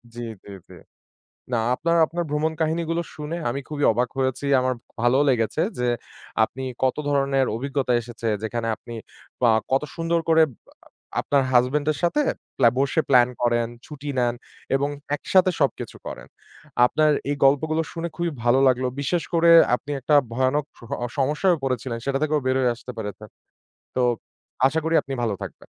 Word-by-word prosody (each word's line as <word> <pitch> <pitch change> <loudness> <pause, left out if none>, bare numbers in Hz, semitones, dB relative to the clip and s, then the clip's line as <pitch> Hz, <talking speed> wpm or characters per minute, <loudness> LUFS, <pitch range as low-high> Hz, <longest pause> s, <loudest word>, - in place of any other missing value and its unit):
জি, - - -7 0.3
জি, - - -12 0.2
জি। - - -12 0.8
না, - - +2 0.2
আপনার 170 +5 0
আপনার 170 +2 -3
ভ্রমণ 155 +2 0
কাহিনীগুলো 165 +1 0
শুনে 150 +2 -5
আমি 135 +3 -3
খুবই 145 -1 -2
অবাক 120 +2 0
হয়েছি। 130 +1 -1 0.2
আমার 130 0 0 0.3
ভালও 120 +4 +3
লেগেছে 115 +4 0 0.2
যে, 125 - 0 0.6
আপনি 130 +4 -7 0.2
কত 130 -1 +2
ধরনের 135 -1 +2
অভিজ্ঞতা 135 0 -1
এসেছে। 115 0 -7 0.2
যেখানে 115 +1 -2
আপনি 120 - -12 0.5
আ - - +6 0.2
কত 135 - +3
সুন্দর 165 0 0
করে 160 0 +6
আ 120 - -22 0.5
আপনার 140 -1 +2
হাসব্যান্ডের 145 +5 +2
সাথে 175 +12 +2 0.4
ব্লা 120 - +6
বসে 140 +3 +2
প্ল্যান 125 -2 +6
করেন, 120 -1 +2 0.2
ছুটি 145 -1 -8
নেন 120 -1 +2 0.4
এবং 140 +1 +1 0.3
একসাথে 185 +4 +3
সবকিছু 140 -4 -1
করেন। - - -7 0.6
আপনার 155 +4 +2 0.2
এই 145 - 0
গল্পগুলো 155 +4 +3
শুনে 170 0 -4
খুবই 170 -1 -1
ভালো 120 +2 +4
লাগলো। 130 0 +1
বিশেষ 165 +5 0
করে, 170 0 +5 0.2
আপনি 140 +4 -5
একটা 150 +4 +1 0.2
ভয়ানক 130 +4 +1 0.2
সহ 115 +3 -13 0.3
সমস্যায়ও 150 +3 +2
পড়েছিলেন, 125 -2 -2
সেটা 135 0 0
থেকেও 155 -1 +1
বের 130 0 +2
হয়ে 125 -2 +2
আসতে 125 - -10
পেরেছেন। 105 0 -6 0.7
তো - - +2 0.7
আশা 150 +4 +1
করি, 160 - 0
আপনি 135 - -5
ভালো 110 -4 0
থাকবেন। - - -9
135 Hz, 160 wpm, -24 LUFS, 125-155 Hz, 0.8 s, আ